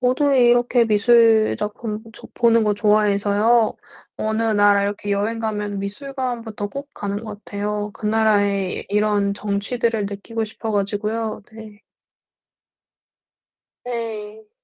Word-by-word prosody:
저도 260 +3 +2
이렇게 245 -1 +4
미술 225 0 +4
작품 210 +1 -4
좋 - - -14
보는 230 -2 +3
것 210 - +2
좋아해서요. 210 +2 +2 0.4
어느 220 +1 -1
나라 205 -2 +4
이렇게 205 0 -3
여행 205 +3 0
가면 210 -2 -3
미술관부터 230 -1 -4
꼭 280 +5 -7
가는 205 +1 -4
것 210 -1 -9
같아요. 210 0 -3
그 215 - -6
나라의 205 -3 +1
이 - - -12
이런 205 -1 +1
정취들을 210 +2 -1
느끼고 215 +3 -4
싶어 220 0 -5
가지고요. 210 +2 -2
네. 220 -2 -12 2.0
네. 220 -3 -6
215 Hz, 260 characters per minute, -21 LUFS, 205-230 Hz, 2.0 s, 이렇게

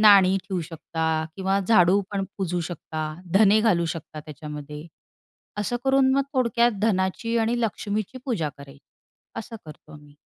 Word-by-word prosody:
नाणी 195 -3 +7
ठेवू 185 -2 -2
शकता 160 0 -6 0.3
किंवा 195 0 +1
झाडू 190 -3 +5
पण 195 -1 -1
पुजू 180 -2 -1
शकता. 160 -2 -5 0.3
धने 210 +1 +6
घालू 185 -7 +3
शकता 155 -1 -8
त्याच्यामध्ये. 150 0 -8 0.7
असं 210 +4 -1
करून 265 0 +4
मग 275 - +3
थोडक्यात 240 -1 +3
धनाची 215 +2 0
आणि 235 +2 +1
लक्ष्मीची 215 +1 -2
पूजा 205 - -1
करायची. 140 0 -13 0.6
असं 225 +1 -7
करतो 155 0 -13
आम्ही. 145 -1 -15
190 Hz, 140 wpm, -25 LUFS, 160-225 Hz, 0.7 s, नाणी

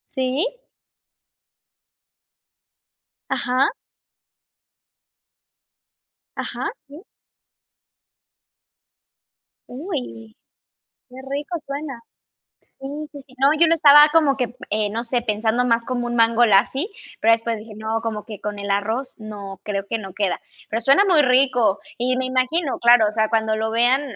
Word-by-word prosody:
Sí. 270 - -1 2.7
Ajá. 255 +2 +1 2.7
Ajá, - - -4 0.2
sí. 295 +6 -13 2.6
Uy. 250 - -7 0.7
Qué 250 - -15
rico 295 +5 -4
suena. 280 -3 -6 0.8
Sí, 270 - -7 0.3
sí, 285 - -10
sí, 260 - -20
no, 275 - +5
yo 335 - +6
lo 330 - +4
estaba 295 -1 +7
como 300 -5 +3
que, 250 -1 -3
eh, 210 -1 0
no 230 +3 -3
sé, 240 0 -1
pensando 220 +2 0
más 230 -1 +1
como 245 -1 -2
un 240 - -3
mango 230 +1 +4
lassi, 240 - +2 0.3
pero 225 - +4
después 230 0 0
dije: 215 +1 -12
"No, 220 +1 -3
como 215 -2 -4
que 210 -4 -9
con 205 -1 -5
el 200 0 -5
arroz 220 +6 -1
no, 200 -3 -9
creo 200 -1 -4
que 230 - -2
no 195 -3 -9
queda". 195 -2 -2 0.3
Pero 225 - -2
suena 275 - +4
muy 330 -5 +5
rico, 250 -5 +3 0.2
y 255 +1 0
me 260 0 -1
imagino, 260 +4 0
claro, 235 -2 +6
o 210 - -5
sea, 220 0 +1
cuando 220 -1 0
lo 220 0 -2
vean, 245 +4 +3
240 Hz, 130 wpm, -21 LUFS, 220-270 Hz, 2.7 s, estaba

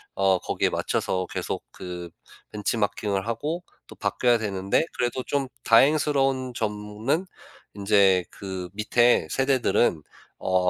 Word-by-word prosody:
어 95 -1 +3
거기에 - - 0
맞춰서 95 0 -1
계속 - - -4
그 90 -1 -7 0.4
벤치마킹을 105 -1 -1
하고 150 +10 -2 0.2
또 - - -12
바뀌어야 120 -2 +2
되는데 100 +4 0
그래도 125 +1 -1
좀 140 -2 -1 0.2
다행스러운 135 0 +3
점은 105 - -2 0.5
인제 100 -3 +4
그 95 -2 -6
밑에 120 -2 +3
세대들은 130 - +2 0.4
어 90 -1 +2
105 Hz, 260 characters per minute, -25 LUFS, 95-130 Hz, 0.5 s, 인제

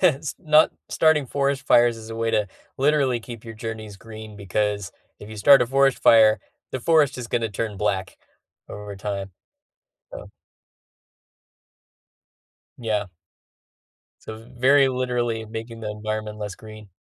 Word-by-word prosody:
s 155 -5 +1
not 155 -2 +4 0.2
starting 155 -4 +3
forest 140 0 -1
fires 120 -1 +4
is 110 0 -11
a 115 - -6
way 115 0 -1
to 105 -1 +1 0.3
literally 135 -3 +2
keep 115 -1 -10
your 115 - -8
journeys 110 -2 -7
green 110 0 -11
because 100 -1 -2 0.3
if 105 - -11
you 110 - -9
start 135 +6 +7
a 125 - +2
forest 135 +1 +2
fire, 110 -1 +6 0.3
the 130 - -3
forest 150 -1 +2
is 120 - -5
gonna 115 -1 -1
turn 105 0 -4
black 95 -2 -2 0.5
over 105 0 -8
time. 100 0 -5 0.9
Yeah. - - -9 2.5
Yeah. 105 -4 -2 1.1
So, 110 - -8
it's 115 +2 -14
very 135 +2 +5
literally 125 -3 -1
making 115 +1 -8
the 105 -1 -4
environment 105 0 -5
less 105 -3 -6
green. 110 -1 -12
115 Hz, 140 wpm, -23 LUFS, 105-130 Hz, 2.5 s, start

